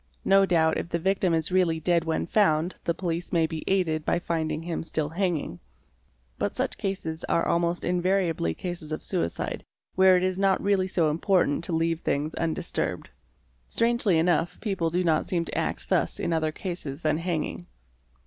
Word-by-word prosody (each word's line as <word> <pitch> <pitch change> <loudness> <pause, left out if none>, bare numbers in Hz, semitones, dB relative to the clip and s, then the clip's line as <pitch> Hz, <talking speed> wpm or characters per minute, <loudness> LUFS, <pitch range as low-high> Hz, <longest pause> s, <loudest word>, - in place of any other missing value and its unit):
No 195 0 +5
doubt 160 -3 +3
if - - -5
the 170 - 0
victim 190 +1 +1
is 165 +1 0
really 180 -3 +2
dead 170 0 +1
when 160 -1 -1
found 170 -3 +2
the 170 - +1
police 170 -1 -3
may 165 -2 +3
be 160 0 -5
aided 165 -5 +1
by - - +1
finding 160 -2 -2
him 170 -1 -3
still 155 -2 -2
hanging. 165 - -2 0.8
But - - -1
such - - -2
cases 165 -5 -3
are 165 - +1
almost 170 +1 0
invariably 175 - +1
cases 175 -4 -6
of 155 - -4
suicide 85 0 -2 0.3
where 185 0 +6
it 180 - 0
is 185 0 0
not 195 -1 +3
really 195 -2 +1
so 170 -5 +1
important 170 -1 +1
to 175 - -3
leave 165 0 +1
things 150 +1 -1
undisturbed. 165 -1 -3 0.6
Strangely 230 -6 +2
enough 165 0 +1
people 190 -7 -1
do 180 +2 0
not 160 -3 +1
seem 170 -3 -1
to - - -5
act - - -2
thus - - 0
in 170 - -1
other 160 -1 +1
cases 170 -4 -6
than 155 0 +1
hanging. 165 - -3
170 Hz, 175 wpm, -26 LUFS, 160-185 Hz, 0.8 s, where